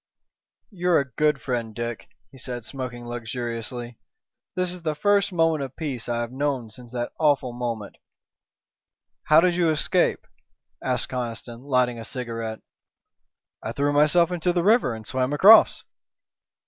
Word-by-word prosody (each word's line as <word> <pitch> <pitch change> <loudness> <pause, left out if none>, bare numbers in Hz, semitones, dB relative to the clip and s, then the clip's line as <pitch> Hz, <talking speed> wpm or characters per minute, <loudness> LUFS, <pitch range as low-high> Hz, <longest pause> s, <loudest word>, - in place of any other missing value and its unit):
"You're 180 -3 +2
a 140 -2 -4
good 150 +4 +1
friend, 115 -4 -3
Dick," 120 -1 -5 0.2
he 135 - -14
said, 125 -3 -5
smoking 125 -3 -6
luxuriously. 120 0 -5 0.6
"This 185 -1 0
is 180 -1 -5
the 155 -2 -2
first 200 +4 +2
moment 165 -3 +2
of 135 -1 -7
peace 135 -8 -4
I 120 0 0
have 120 0 -4
known 130 -4 -2
since 120 +1 -11
that 120 -1 -3
awful 145 -5 +2
moment." 120 -4 -5 1.3
"How 155 +1 +6
did 175 0 +2
you 170 -2 +2
escape?" 155 -1 +1 0.6
asked - - -1
Conniston, 120 -1 -5
lighting 125 -3 +1
a - - -6
cigarette. 115 -2 -5 1.0
"I 110 - -5
threw 145 +2 0
myself 155 +4 +4
into 180 0 0
the 175 -1 0
river 210 - +3
and 110 -1 -10
swam 130 +4 -1
across." 205 +9 +7
130 Hz, 150 wpm, -24 LUFS, 120-160 Hz, 1.3 s, across